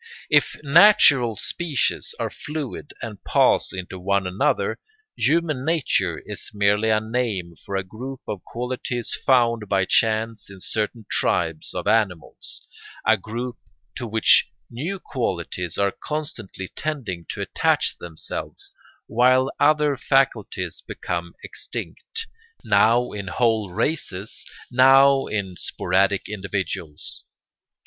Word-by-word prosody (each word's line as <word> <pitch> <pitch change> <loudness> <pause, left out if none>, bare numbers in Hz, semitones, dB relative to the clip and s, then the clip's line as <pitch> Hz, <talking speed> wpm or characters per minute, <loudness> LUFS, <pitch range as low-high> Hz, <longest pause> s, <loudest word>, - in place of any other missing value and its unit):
If - - +4
natural 145 - +6
species 155 - -1
are - - -2
fluid 145 -1 -6
and 105 -4 -7
pass - - +3
into 95 0 -6
one 100 +1 +1
another, 90 +2 0 0.4
human 155 -4 +1
nature 130 - +1
is 105 -1 -5
merely 105 +2 +3
a 110 -1 +4
name 110 -6 -2
for 100 - -5
a 95 - 0
group 125 +7 -8
of 105 -4 -5
qualities 125 0 -3
found 115 -5 +3
by 95 -1 +2
chance 110 +1 +1
in 95 -1 -11
certain 110 +3 -3
tribes 80 -1 0
of - - -3
animals, 95 -8 -1 0.4
a 110 - +6
group 120 +4 -5 0.4
to 120 - -4
which 110 0 +5 0.2
new 165 +12 -3
qualities 90 - -3
are 100 -1 +2
constantly 145 - -5
tending 115 - -4
to - - -4
attach - - +1
themselves 85 -3 -5 0.3
while 130 +3 +3
other 150 -1 +4
faculties 115 - 0
become 85 0 -4
extinct, 455 0 -6 0.4
now 115 +4 +4
in 100 -2 -6
whole 110 0 +1
races, 100 - -3 0.2
now 135 +2 +6
in 95 -4 -3
sporadic 95 +5 +1
individuals. 95 -6 -4
110 Hz, 115 wpm, -23 LUFS, 95-130 Hz, 0.4 s, natural